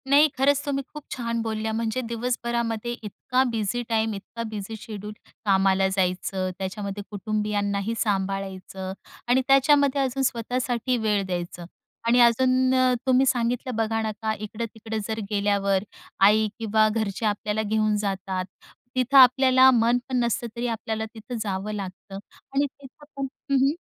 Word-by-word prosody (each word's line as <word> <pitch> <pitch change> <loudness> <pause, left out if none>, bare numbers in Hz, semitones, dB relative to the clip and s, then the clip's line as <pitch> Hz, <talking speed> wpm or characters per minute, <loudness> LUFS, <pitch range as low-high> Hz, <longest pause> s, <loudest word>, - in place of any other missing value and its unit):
नाही, 290 +2 +7
खरंच 280 +1 +3
तुम्ही 275 -1 -1
खूप 300 -1 -8
छान 235 -2 -2
बोलल्या. 220 -1 -2
म्हणजे 225 +2 -1
दिवसभरामध्ये 235 -1 -2
इतका 250 +5 0
बिझी 225 +1 -1
टाईम, 220 -1 +1
इतका 210 +4 -7
बिझी 215 0 -6
शेड्यूल. 210 -1 -7 0.3
कामाला 195 -1 +3
जायचं. 185 0 0
त्याच्यामध्ये 200 +1 -4
कुटुंबियांनाही 205 0 -1
सांभाळायचं 190 -2 -2 0.3
आणि 250 +2 +4
त्याच्यामध्ये 280 0 +4
अजून 270 0 0
स्वतःसाठी 245 0 -1
वेळ 210 -3 +1
द्यायचं 175 -1 -4 0.4
आणि 240 +1 +5
अजून 255 +2 +4
अ, 255 -1 +4
तुम्ही 260 +1 +5
सांगितलं 245 0 0
बघा 225 0 0
ना, 220 -1 -1
का 220 +1 -2
इकडं-तिकडं 220 +1 -6
जर 220 0 -3
गेल्यावर 200 -2 +1 0.4
आई 210 +2 +5
किंवा 220 -1 +3
घरचे 215 -1 -2
आपल्याला 210 +1 0
घेऊन 215 0 +1
जातात. 195 -2 -2 0.5
तिथं 255 +2 +3
आपल्याला 260 0 +7
मन 235 0 +3
पण 260 - -1
नसतं 235 0 -1
तरी 240 +1 -2
आपल्याला 220 -1 -3
तिथं 230 +2 -7
जावं 200 0 -3
लागतं 195 0 -7 0.4
आणि 280 +1 +3
तिथं 280 +1 -13
पण 275 -1 -2 0.2
हं, - - +4
हं. 280 - +2
220 Hz, 145 wpm, -25 LUFS, 205-250 Hz, 0.5 s, नाही